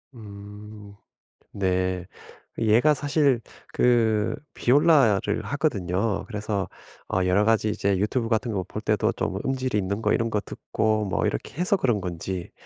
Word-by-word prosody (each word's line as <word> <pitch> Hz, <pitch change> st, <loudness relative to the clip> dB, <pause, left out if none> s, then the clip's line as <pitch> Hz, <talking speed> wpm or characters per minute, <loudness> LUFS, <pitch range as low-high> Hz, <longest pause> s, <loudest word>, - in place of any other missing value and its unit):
음. 105 Hz, -1 st, -11 dB, 0.6 s
네. 95 Hz, -2 st, -1 dB, 0.5 s
얘가 115 Hz, +7 st, +4 dB
사실 145 Hz, -3 st, +2 dB, 0.3 s
그 115 Hz, -3 st, +2 dB, 0.2 s
비올라를 135 Hz, -6 st, +3 dB
하거든요. 100 Hz, -, -1 dB
그래서 105 Hz, -3 st, -3 dB, 0.4 s
어 95 Hz, 0 st, +1 dB
여러 95 Hz, +3 st, +3 dB
가지 110 Hz, -1 st, +2 dB
이제 100 Hz, -2 st, 0 dB
유튜브 115 Hz, +4 st, 0 dB
같은 115 Hz, 0 st, 0 dB
거 95 Hz, -3 st, -2 dB
볼 -, -, -6 dB
때도 -, -, +1 dB
좀 95 Hz, -, -3 dB
음질이 130 Hz, -4 st, -1 dB
있는 100 Hz, +2 st, -2 dB
거 -, -, +1 dB
이런 115 Hz, 0 st, 0 dB
거 105 Hz, -2 st, -1 dB
듣고 110 Hz, -1 st, -1 dB
뭐 95 Hz, -, -1 dB
이렇게 -, -, -3 dB
해서 180 Hz, +3 st, +2 dB
그런 120 Hz, -, +1 dB
건지 90 Hz, 0 st, -5 dB
105 Hz, 265 characters per minute, -25 LUFS, 100-120 Hz, 0.6 s, 얘가